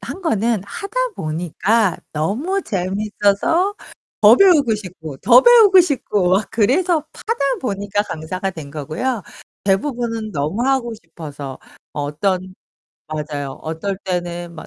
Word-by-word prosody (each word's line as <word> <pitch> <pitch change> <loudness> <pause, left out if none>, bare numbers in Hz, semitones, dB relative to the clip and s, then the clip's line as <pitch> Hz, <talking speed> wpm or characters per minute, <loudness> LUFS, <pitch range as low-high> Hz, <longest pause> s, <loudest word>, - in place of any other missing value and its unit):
한 385 - -7
거는 225 - 0
하다 395 - -8 0.2
보니까 175 +6 0 0.2
너무 250 - -1
재밌어서 205 - 0 0.5
더 220 +2 +8
배우고 300 - +5
싶고, 175 -8 -8
더 245 - +6
배우고 440 -6 +8
싶고 225 - 0
막 195 +2 +2
그래서 305 - +2
파다 455 +2 -4 0.2
보니까 205 -4 -1
강사가 185 +3 -4
된 160 -6 -9
거고요. 160 - -3 0.4
대부분은 225 +2 -1
너무 155 +10 -1
하고 260 -3 0
싶어서 150 -7 -9 0.3
어 145 - -3
어떤 185 +5 -2 0.5
맞아요. 150 -3 -4
어떨 165 +5 -3
때는 175 -2 -4
막 160 - -10
200 Hz, 260 characters per minute, -19 LUFS, 165-250 Hz, 0.5 s, 더